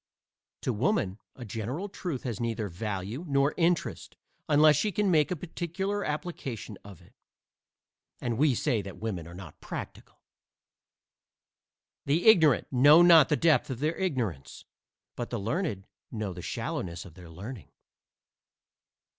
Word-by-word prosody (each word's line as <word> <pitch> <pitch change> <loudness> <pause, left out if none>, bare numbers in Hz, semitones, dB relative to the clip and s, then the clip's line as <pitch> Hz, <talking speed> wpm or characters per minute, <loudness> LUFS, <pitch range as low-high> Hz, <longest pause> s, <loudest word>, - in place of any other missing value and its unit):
To 125 - -1
woman 110 - 0 0.2
a 125 - -9
general 115 - -4
truth 175 -8 -5
has 120 -5 -4
neither 115 -3 -2
value 100 - -4
nor 140 0 +2
interest 170 -1 -1 0.3
unless 150 0 +6
she 210 +9 0
can 200 0 +1
make 155 -3 +3
a 180 - -1
particular 185 +5 -3
application 140 - -5
of 100 -4 -13
it. - - -22 1.1
And 120 -1 -3
we 145 -3 +4
say 120 -4 0
that 95 -2 -9
women 95 -7 -4
are 85 - -11
not 90 -4 -11
practical! - - -8 1.8
The 150 +5 +1
ignorant 160 - +6
know 145 +6 +7
not 165 -5 +7
the 150 - +2
depth 155 -6 +3
of 130 - -3
their 155 +3 0
ignorance, 115 - -3 0.5
but 120 - -5
the 120 - -3
learned 110 - -2 0.2
know 105 -5 -4
the 90 - -8
shallowness 85 +1 -4
of 90 - -12
their 90 0 -13
learning. 100 +8 -9
130 Hz, 140 wpm, -28 LUFS, 100-160 Hz, 1.8 s, know